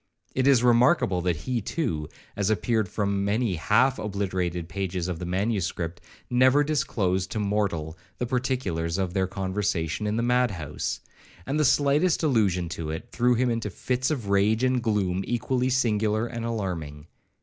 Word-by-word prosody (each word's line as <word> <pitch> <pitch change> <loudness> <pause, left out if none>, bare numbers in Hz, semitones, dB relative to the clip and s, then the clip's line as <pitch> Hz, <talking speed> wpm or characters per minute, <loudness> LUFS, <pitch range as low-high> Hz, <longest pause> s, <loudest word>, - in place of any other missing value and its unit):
It 130 +1 +1
is 130 -4 +5
remarkable, 120 - +4
that 90 -1 0
he 120 +10 -2
too, 85 - -2 0.3
as 100 0 0
appeared 110 -2 +1
from 100 -1 -1
many 105 +1 +1
half 125 +10 +3
obliterated 95 -4 -2
pages 95 -2 -3
of 90 -3 -3
the 90 - -5
manuscript, 90 -3 -2 0.3
never 130 +4 +4
disclosed 100 -11 0
to 110 - -2
mortal 100 -7 -1 0.2
the 125 - -1
particulars 125 -10 -1
of 95 -2 -1
their 95 -1 +1
conversation 95 -1 -2
in 105 - 0
the 115 - 0
mad 125 +1 +3
house; 80 -8 -4 0.4
and 145 +3 -1
the 150 - +3
slightest 145 +6 +3
allusion 100 - +2
to 85 -3 -5
it 80 +10 -5
threw 125 0 +2
him 125 +1 +1
into 115 -2 -2
fits 125 +6 -1
of 120 -10 -3
rage 105 +4 +3
and 130 -1 +2
gloom 100 -5 0
equally 125 +1 0
singular 110 -3 +1
and 115 -1 -5
alarming. 85 -10 -4
105 Hz, 160 wpm, -26 LUFS, 90-125 Hz, 0.4 s, is